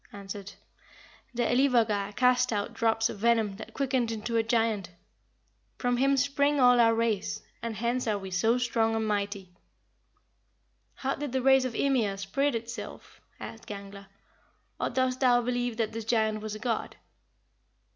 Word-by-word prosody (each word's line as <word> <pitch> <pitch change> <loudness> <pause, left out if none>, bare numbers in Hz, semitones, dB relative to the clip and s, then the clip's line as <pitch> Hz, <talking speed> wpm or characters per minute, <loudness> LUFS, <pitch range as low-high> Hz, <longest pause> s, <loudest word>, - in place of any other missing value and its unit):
answered, 200 0 -8 0.8
'The 240 - +1
Elivagar 230 -6 +2
cast 250 0 +3
out 210 +2 -2
drops 225 -1 +1
of 210 - -7
venom 225 -2 +2
that 220 - -10
quickened 260 -4 0
into 225 +1 -4
a 225 - +4
giant. 225 -5 0 0.9
From 245 -1 0
him 275 +2 +3
spring 280 +2 +2
all 245 -1 +6
our 230 -1 +5
race, 215 -2 -1 0.2
and 230 -1 -4
hence 240 +3 -1
are 210 -2 +1
we 190 -1 -8
so 220 +7 +2
strong 230 -2 +1
and 220 -1 -1
mighty.'" 200 -3 -3 1.4
"How 270 0 -2
did 285 -3 -5
the 260 -1 0
race 265 -1 +5
of 245 -3 -4
Ymir 235 -8 +1
spread 235 +8 0
itself?" 230 +1 -7 0.2
asked 225 - -9
Gangler; 200 -1 -9 0.7
"or - - 0
dost 260 -1 0
thou 245 -2 +4
believe 245 -1 -2
that 225 -2 -1
this 225 0 -6
giant 220 -2 +1
was 215 0 -5
a - - -8
god?" 230 -1 -2
230 Hz, 155 wpm, -28 LUFS, 210-250 Hz, 1.4 s, all